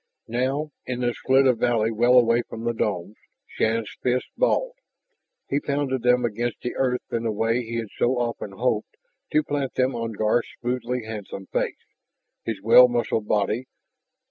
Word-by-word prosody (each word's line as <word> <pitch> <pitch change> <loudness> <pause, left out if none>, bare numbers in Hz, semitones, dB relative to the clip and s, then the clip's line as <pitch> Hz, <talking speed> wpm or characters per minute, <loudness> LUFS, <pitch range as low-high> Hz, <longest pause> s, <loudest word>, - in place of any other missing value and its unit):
Now, 135 +6 -1 0.2
in 125 -1 -3
this 120 -1 0
slit 135 +1 +4
of 125 -3 +3
valley 115 -2 +2
well 120 +3 +4
away 120 -1 +5
from 115 - -7
the 120 0 0
domes, 105 -2 -2 0.3
Shann's 110 -1 -1
fists 125 0 0
balled. - - +1 0.7
He 140 - 0
pounded 140 -3 -1
them 125 0 +3
against 120 +1 -2
the 125 - -3
earth 125 -1 0
in 115 - 0
a - - +1
way 115 +3 +1
he 115 0 -6
had 115 -2 -3
so 125 +1 +2
often 115 -4 -3
hoped 110 0 -1 0.3
to 155 - +3
plant 145 -2 -2
them 130 +1 +2
on 115 -1 -3
Garth's 110 +3 +1
smoothly 125 0 -2
handsome 105 -3 -7
face, - - 0 0.7
his 110 -3 -3
well 120 +3 +8
muscled 120 -3 -1
body. 110 +4 0
120 Hz, 170 wpm, -24 LUFS, 115-125 Hz, 0.7 s, well